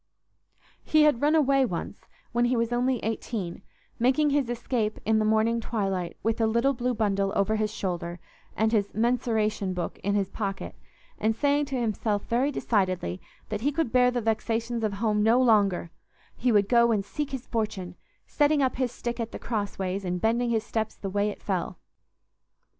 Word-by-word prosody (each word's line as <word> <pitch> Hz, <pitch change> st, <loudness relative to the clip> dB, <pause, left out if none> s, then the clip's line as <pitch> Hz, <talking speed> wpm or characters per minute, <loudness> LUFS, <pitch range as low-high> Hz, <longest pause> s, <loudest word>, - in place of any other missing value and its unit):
He 310 Hz, -1 st, +4 dB
had 295 Hz, -6 st, +3 dB
run 300 Hz, +2 st, +3 dB
away 275 Hz, -3 st, +4 dB
once 200 Hz, -3 st, -4 dB, 0.2 s
when 240 Hz, 0 st, +2 dB
he 245 Hz, +1 st, +2 dB
was 230 Hz, +1 st, 0 dB
only 250 Hz, +1 st, +1 dB
eighteen, 215 Hz, -5 st, -3 dB, 0.4 s
making 270 Hz, +5 st, +3 dB
his 280 Hz, -4 st, +1 dB
escape 240 Hz, -2 st, -2 dB
in 220 Hz, 0 st, +3 dB
the 215 Hz, -, +1 dB
morning 220 Hz, +2 st, +2 dB
twilight 195 Hz, -6 st, -2 dB
with 225 Hz, +2 st, 0 dB
a 225 Hz, -, +4 dB
little 235 Hz, +5 st, +2 dB
blue 250 Hz, 0 st, -1 dB
bundle 200 Hz, -3 st, +1 dB
over 200 Hz, +2 st, +2 dB
his 215 Hz, -1 st, 0 dB
shoulder, 175 Hz, -4 st, -4 dB, 0.4 s
and 220 Hz, 0 st, +2 dB
his 205 Hz, -3 st, 0 dB
"mensuration 220 Hz, -4 st, 0 dB
book" 180 Hz, -, -4 dB
in 200 Hz, +1 st, -1 dB
his 200 Hz, -2 st, +1 dB
pocket, 195 Hz, -3 st, -4 dB, 0.5 s
and 220 Hz, +1 st, +1 dB
saying 285 Hz, +3 st, +2 dB
to 270 Hz, -2 st, -3 dB
himself 215 Hz, -2 st, -1 dB
very 250 Hz, +5 st, +1 dB
decidedly 185 Hz, -, -1 dB, 0.3 s
that 210 Hz, -1 st, -3 dB
he 285 Hz, +5 st, +1 dB
could 295 Hz, -5 st, -1 dB
bear 250 Hz, 0 st, +5 dB
the 245 Hz, -1 st, -1 dB
vexations 225 Hz, +1 st, -1 dB
of 215 Hz, -2 st, 0 dB
home 210 Hz, 0 st, 0 dB
no 225 Hz, +4 st, +4 dB
longer—he 210 Hz, +1 st, 0 dB
would 205 Hz, -2 st, +4 dB
go 235 Hz, 0 st, +4 dB
and 205 Hz, -3 st, 0 dB
seek 295 Hz, +6 st, -4 dB
his 265 Hz, -3 st, -5 dB
fortune, 210 Hz, -6 st, -3 dB, 0.3 s
setting 290 Hz, -1 st, +2 dB
up 260 Hz, -, 0 dB
his 255 Hz, -2 st, 0 dB
stick 240 Hz, 0 st, -5 dB
at 230 Hz, -1 st, -3 dB
the -, -, -6 dB
crossways 200 Hz, -3 st, -3 dB
and 180 Hz, -1 st, -2 dB
bending 235 Hz, +4 st, +1 dB
his 225 Hz, -2 st, +1 dB
steps 220 Hz, -1 st, -2 dB
the 195 Hz, -, -6 dB
way 205 Hz, +1 st, +1 dB
it 205 Hz, -, -9 dB
fell. 185 Hz, -3 st, -2 dB
225 Hz, 180 wpm, -27 LUFS, 205-245 Hz, 0.5 s, bear